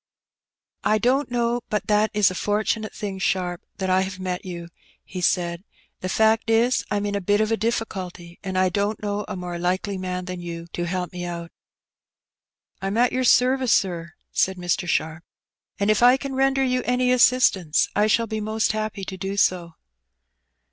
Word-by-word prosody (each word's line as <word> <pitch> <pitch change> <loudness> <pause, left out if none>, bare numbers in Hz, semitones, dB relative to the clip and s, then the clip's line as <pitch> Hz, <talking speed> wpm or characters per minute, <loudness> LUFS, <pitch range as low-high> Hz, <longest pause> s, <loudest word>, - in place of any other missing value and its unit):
"I 215 - +3
don't 255 +6 +1
know 240 0 0
but 210 - -1
that 210 +1 +3
it - - -7
is 200 -3 +5
a - - -4
fortunate 215 +3 -1
thing. 195 -2 -5
Sharp, 180 -1 -1 0.2
that 190 -1 -1
I 185 +1 +4
have 190 0 -4
met 180 -1 -3
you,'* 170 -2 -7 0.3
he 185 - -7
said. 175 0 0 0.2
" - - -38
The 185 - -3
fact 220 +3 +2
is, 235 +3 +3
Tm 205 0 -1
in - - -4
a 200 - -1
bit 205 +3 +2
of 215 +1 +1
a - - +4
difficulty, 190 -6 -4
and 190 -1 -3
I 185 0 +3
don't 205 +3 -1
know 205 0 -2
a 210 - -5
more 180 -1 -5
likely 185 +2 -1
man 185 0 -3
than 180 -1 -6
you 170 -1 -6
to 175 - -2
help 180 0 -3
me 180 0 -5
out. 170 -1 -5 0.7
" - - -52
I*m 195 +3 -2
at 245 +1 +4
your 255 0 0
service, 255 0 +4
sir, 170 -3 0 0.2
said 190 0 +1
Mr. 175 +1 -1
Sharp, 160 +1 -1 0.3
" - - -41
and 200 +1 +3
if 215 - +1
I 250 +2 +7
can 275 0 -5
render 270 0 +2
you 255 -1 +1
any 250 0 +1
assistance, 240 -10 +4
I 210 +1 +3
shall 230 +2 +3
be 220 -1 -4
most 215 +1 0
happy 215 -2 -3
to 190 - -6
do 195 +1 -4
so. 175 -4 +1
200 Hz, 200 wpm, -23 LUFS, 180-220 Hz, 0.7 s, I